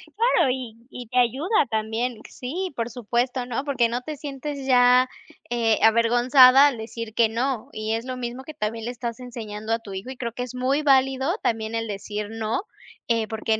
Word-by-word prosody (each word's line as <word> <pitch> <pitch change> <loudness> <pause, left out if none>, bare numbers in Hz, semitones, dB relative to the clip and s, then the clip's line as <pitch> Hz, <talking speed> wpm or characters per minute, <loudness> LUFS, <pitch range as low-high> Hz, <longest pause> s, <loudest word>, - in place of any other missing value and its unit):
Claro, 460 - +3
y 250 -4 -5
y 245 -3 -9
te 250 - -4
ayuda 280 - +2
también. 225 +2 -2
Sí, 350 +9 -4
por 235 0 -2
supuesto, 245 +2 -1
¿no? 250 +2 -3
Porque, 255 -5 +1
no 240 +2 -2
te 305 +4 -6
sientes 280 0 -6
ya, 250 0 +5 0.4
eh, 230 -2 +2
avergonzada 245 +4 +6
al 275 -4 -1
decir 225 0 -7
que 230 0 +4
no, 245 +1 -2
y 215 0 -2
es 225 +1 -2
lo 255 0 -4
mismo 245 +1 -5
que 310 - -9
también, 225 -2 -3
le 245 - -2
estás 235 -1 -5
enseñando 225 -3 -5
a 230 - 0
tu 205 -4 -10
hijo 190 +6 -6
y 265 - -6
creo 235 -2 -4
que 250 - -4
es 250 0 -8
muy 260 +4 +1
válido 270 +1 +3
también 220 0 -1
el 225 0 -2
decir 210 +1 -5
no, 225 +6 -2 0.5
eh, 230 -2 +1
porque, 220 0 -1
245 Hz, 200 wpm, -24 LUFS, 225-260 Hz, 0.5 s, avergonzada